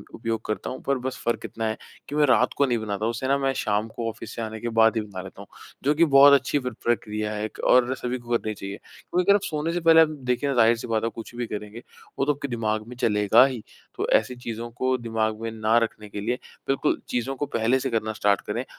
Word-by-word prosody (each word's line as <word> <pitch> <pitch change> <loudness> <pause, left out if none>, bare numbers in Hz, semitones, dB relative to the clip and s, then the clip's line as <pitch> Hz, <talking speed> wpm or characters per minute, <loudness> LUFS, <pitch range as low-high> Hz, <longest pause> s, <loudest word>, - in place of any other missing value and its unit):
उपयोग 115 -1 -3
करता 110 - -3
हूँ 130 - -6
पर 140 -1 +1
बस 130 - -4
फ़र्क 120 - -1
इतना 115 - -4
है 110 - -2 0.3
कि 145 - -4
मैं 150 0 +4
रात 125 -2 +3
को 140 - +4
नहीं 120 -3 +1
बनाता। 105 -1 -3
उसे 120 +3 -2
ना 140 +1 +3
मैं 135 -1 0
शाम 105 -3 -1
को 115 - -3
ऑफ़िस 110 - -9
से - - -4
आने 110 0 -5
के 120 - -3
बाद 110 +1 +5
ही 110 - +1
बना 100 -3 -7
लेता 95 +1 -11
हूँ। 100 - -12 0.4
जो 145 +3 +3
कि 170 +2 +5
बहुत 140 -1 +8
अच्छी 140 +1 +3
प्र 125 -2 -4
प्रक्रिया 105 -2 -1
है 105 +1 -3
और 125 0 +4
सभी 125 0 -3
को 120 0 0
करनी 110 -1 -4
चाहिए। 100 -1 -7
क्योंकि 180 +1 -4
अगर 200 +1 +6
आप 205 - +1
सोने 155 0 -2
से 175 - 0
पहले 165 -1 +7
आप 160 - +5 0.2
देखिए 125 +3 +1
ना 135 - 0
ज़ाहिर-सी 115 -1 +3
बात 110 -1 0
है 115 - +1
कुछ 115 +1 -9
भी 120 -1 -3
करेंगे, 105 +2 -7 0.4
वो 135 - +2
तो 150 - +2
आपके 140 0 -5
दिमाग 110 -3 -2
में 125 - -9
चलेगा 105 +1 +5
ही। 130 -5 -4 0.3
तो - - -2
ऐसी 125 - -8
चीज़ों 120 -1 -6
को 130 +2 0
दिमाग 110 -2 -2
में 115 0 -3
ना 110 +1 +1
रखने 105 -2 -6
के 100 - -6
लिए 115 +4 0 0.3
बिल्कुल 135 - +1
चीज़ों 125 +3 -2
को 145 - -2
पहले 115 +4 +2
से 135 0 -2
करना 110 -2 -1
स्टार्ट 105 -2 +2
करें। - - -2
115 Hz, 255 wpm, -25 LUFS, 110-130 Hz, 0.4 s, बहुत